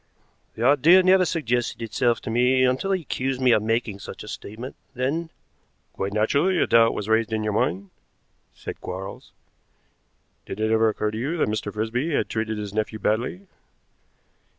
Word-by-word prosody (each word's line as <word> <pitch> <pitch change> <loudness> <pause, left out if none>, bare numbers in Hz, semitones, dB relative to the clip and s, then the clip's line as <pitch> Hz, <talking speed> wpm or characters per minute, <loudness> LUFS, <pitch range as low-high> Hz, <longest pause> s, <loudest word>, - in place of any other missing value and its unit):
"The 115 - -4
idea 150 +7 +6
never 185 0 +5
suggested 125 -8 -1
itself 115 +1 0
to - - -5
me 125 +2 +3
until 130 +10 +1
he 185 -3 0
accused 130 -1 -2
me 130 -1 +4
of 110 - +4
making 115 -2 -1
such - - -9
a - - -11
statement, 115 +6 -8 0.2
then 145 +7 -1 0.3
" - - -44
"Quite 100 +1 -3
naturally 140 - +2
a - - +3
doubt 115 0 +4
was 105 - -4
raised 110 +1 +2
in 110 -1 -1
your 105 -1 -1
mind," 100 -2 -1 0.6
said - - -8
Quarles. 95 +2 -7 1.2
"Did 100 - -6
it 110 0 +1
ever 110 0 +4
occur 105 0 -2
to 110 - -5
you 145 +8 -2
that 150 - +1
Mr. 105 -1 -3
Frisby 120 +9 -1
had - - 0
treated 110 -1 -2
his 105 -2 -5
nephew 110 0 -2
badly?" 115 - -1
115 Hz, 175 wpm, -24 LUFS, 110-135 Hz, 1.2 s, idea